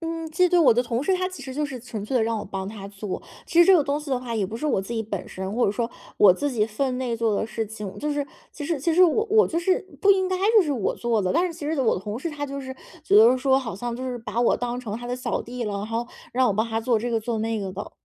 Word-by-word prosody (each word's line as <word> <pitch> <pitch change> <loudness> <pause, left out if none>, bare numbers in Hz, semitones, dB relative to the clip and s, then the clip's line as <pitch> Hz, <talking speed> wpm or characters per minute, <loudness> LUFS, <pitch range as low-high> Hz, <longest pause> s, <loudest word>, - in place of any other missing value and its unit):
嗯， 330 -1 -4
记 360 +2 +3
得 350 -1 +4
我 250 -5 +7
的 240 - +2
同 235 +2 -1
事 380 - +1
他 370 0 -1
其 370 - -10
实 265 - -7
就 295 +2 -1
是 260 -4 -7
纯 225 -4 -6
粹 255 +4 -1
地 225 - +3
让 225 -1 0
我 205 - -5
帮 195 0 -5
他 205 -2 -8
做， 200 0 -6 0.2
其 340 - -1
实 345 - +9
这 380 0 +7
个 305 - +3
东 280 +1 -1
西 300 -1 -9
的 260 -2 +1
话 240 -2 -6
也 205 -4 0
不 225 - -6
是 305 - -6
我 265 -10 +2
自 235 +5 -6
己 225 - -1
本 205 -3 -5
身， 190 +1 -5
或 240 +2 +2
者 200 - +1
说 235 +1 -2 0.3
我 195 -3 +7
自 290 +10 -2
己 225 -5 +1
分 250 +4 -2
内 245 -3 -2
做 225 -2 +1
的 220 - 0
事 225 0 -3
情， 210 -2 -7
就 300 0 -1
是 290 -1 -1 0.3
其 295 - -7
实 315 -1 -1
其 320 +4 0
实 365 - +6
我 400 +6 +4
我 435 +1 +5
就 335 - -1
是 370 +2 +2 0.2
不 400 -1 +6
应 375 -1 +1
该 370 - 0 0.2
就 415 - +8
是 300 - -2
我 235 -8 0
做 235 -3 0
的， 185 - 0
但 340 +4 +3
是 350 - -2
其 315 -3 -7
实 315 -3 0
我 240 - +2
的 - - -4
同 205 +3 -5
事 320 +6 -4
他 290 -1 -4
就 275 0 -5
是 260 0 -6 0.3
觉 205 - +3
得 230 +4 +7
说， 265 +1 +3
好 225 -8 -5
像 235 +4 -4
就 255 - -5
是 250 - -3
把 230 0 -3
我 240 - +3
当 245 0 -3
成 220 -4 -5
他 240 +1 -7
的 250 - -2
小 250 -2 -2
弟 245 0 -5
了， 210 - -3
然 200 - -4
后 230 +2 -2 0.3
让 255 +1 +3
我 205 - +2
帮 220 +3 0
他 225 0 -1
做 230 0 +2
这 240 +3 -2
个 225 - +1
做 225 0 -3
那 225 0 -1
个 190 -2 -4
的。 205 +2 -6
245 Hz, 355 characters per minute, -24 LUFS, 220-290 Hz, 0.3 s, 实